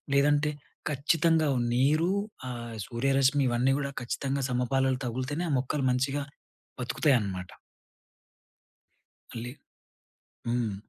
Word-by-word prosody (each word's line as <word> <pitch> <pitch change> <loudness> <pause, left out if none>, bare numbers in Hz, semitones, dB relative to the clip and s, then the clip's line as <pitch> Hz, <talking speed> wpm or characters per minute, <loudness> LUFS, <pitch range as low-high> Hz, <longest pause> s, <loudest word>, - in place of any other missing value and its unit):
లేదంటే 145 +1 +4 0.4
ఖచ్చితంగా 155 +2 +2 0.3
నీరు 150 +7 +3 0.4
ఆహ్, 120 -2 -6
సూర్యరశ్మి 135 +3 +2
ఇవన్నీ 125 +3 +2
గూడా 140 -1 -2
ఖచ్చితంగా 135 +3 -2
సమపాలలో 130 +1 +1
తగిలితేనే 130 +8 -2
ఆ - - +1
మొక్కలు 135 +1 -1
మంచిగా 135 +3 0 0.6
బతుకుతాయనమాట. 110 - +1 1.8
మళ్ళీ 120 +1 -5 1.0
హ్మ్. 120 -4 0
135 Hz, 90 wpm, -29 LUFS, 120-145 Hz, 1.8 s, లేదంటే